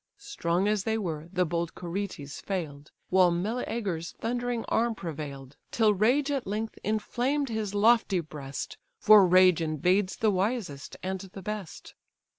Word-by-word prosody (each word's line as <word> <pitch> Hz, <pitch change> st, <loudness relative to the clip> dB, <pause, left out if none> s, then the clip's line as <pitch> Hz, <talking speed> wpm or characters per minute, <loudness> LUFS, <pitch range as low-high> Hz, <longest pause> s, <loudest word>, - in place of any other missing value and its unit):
Strong 170 Hz, +4 st, -1 dB
as 210 Hz, -2 st, +1 dB
they 220 Hz, +1 st, 0 dB
were, 165 Hz, -6 st, -4 dB
the 180 Hz, -1 st, +1 dB
bold 170 Hz, 0 st, -2 dB
Curetes 175 Hz, -5 st, -5 dB
fail'd, 155 Hz, -7 st, -5 dB, 0.2 s
While 185 Hz, -1 st, +6 dB
Meleager's 190 Hz, -2 st, -2 dB
thundering 240 Hz, 0 st, -2 dB
arm 230 Hz, 0 st, +1 dB
prevail'd: 145 Hz, -6 st, -7 dB
Till 220 Hz, -2 st, +3 dB
rage 250 Hz, +9 st, +2 dB
at 275 Hz, -6 st, -2 dB
length 215 Hz, +3 st, -3 dB
inflamed 245 Hz, +6 st, -1 dB
his 215 Hz, -3 st, -3 dB
lofty 215 Hz, -2 st, +4 dB
breast 145 Hz, -4 st, -7 dB, 0.2 s
(For 210 Hz, -3 st, +7 dB
rage 185 Hz, -1 st, +5 dB
invades 180 Hz, +5 st, +1 dB
the 220 Hz, -1 st, +2 dB
wisest 190 Hz, -, -2 dB
and 190 Hz, 0 st, -2 dB
the 195 Hz, 0 st, -10 dB
best). 210 Hz, -4 st, -6 dB
190 Hz, 140 wpm, -28 LUFS, 170-220 Hz, 0.2 s, For